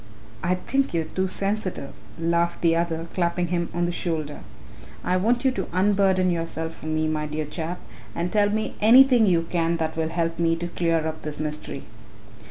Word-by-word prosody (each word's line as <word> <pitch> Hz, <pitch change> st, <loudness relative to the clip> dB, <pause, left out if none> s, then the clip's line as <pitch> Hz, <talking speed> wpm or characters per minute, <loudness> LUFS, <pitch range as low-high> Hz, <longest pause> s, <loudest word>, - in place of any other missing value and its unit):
"I 180 Hz, +1 st, +2 dB
think 270 Hz, +4 st, -1 dB
you 165 Hz, -, +2 dB
are -, -, -14 dB
too 190 Hz, 0 st, +1 dB
sensitive," 195 Hz, -6 st, -1 dB, 0.2 s
laughed 170 Hz, +1 st, 0 dB
the 165 Hz, -1 st, +3 dB
other, 165 Hz, -1 st, -1 dB
clapping 175 Hz, -1 st, 0 dB
him 170 Hz, -1 st, -1 dB
on 175 Hz, +1 st, 0 dB
the 175 Hz, -, 0 dB
shoulder. 160 Hz, -4 st, -3 dB, 0.6 s
"I 180 Hz, -, +1 dB
want 235 Hz, +7 st, +1 dB
you 265 Hz, -, +5 dB
to 255 Hz, -, -3 dB
unburden 190 Hz, -1 st, +3 dB
yourself 165 Hz, -1 st, -4 dB
to -, -, -8 dB
me, 155 Hz, 0 st, 0 dB
my 155 Hz, -1 st, -1 dB
dear 150 Hz, +1 st, -3 dB
chap, 165 Hz, +3 st, -5 dB, 0.4 s
and 175 Hz, +1 st, -2 dB
tell 205 Hz, -1 st, +4 dB
me 215 Hz, +1 st, -1 dB
anything 245 Hz, +1 st, +7 dB
you 170 Hz, -3 st, +3 dB
can 170 Hz, -1 st, +1 dB
that 160 Hz, -1 st, -2 dB
will 160 Hz, 0 st, -1 dB
help 165 Hz, 0 st, -2 dB
me 165 Hz, -1 st, +2 dB
to 170 Hz, +1 st, -4 dB
clear 165 Hz, -2 st, 0 dB
up 160 Hz, 0 st, -5 dB
this 150 Hz, -1 st, -5 dB
mystery." 150 Hz, -2 st, -4 dB
170 Hz, 190 wpm, -24 LUFS, 160-185 Hz, 0.6 s, anything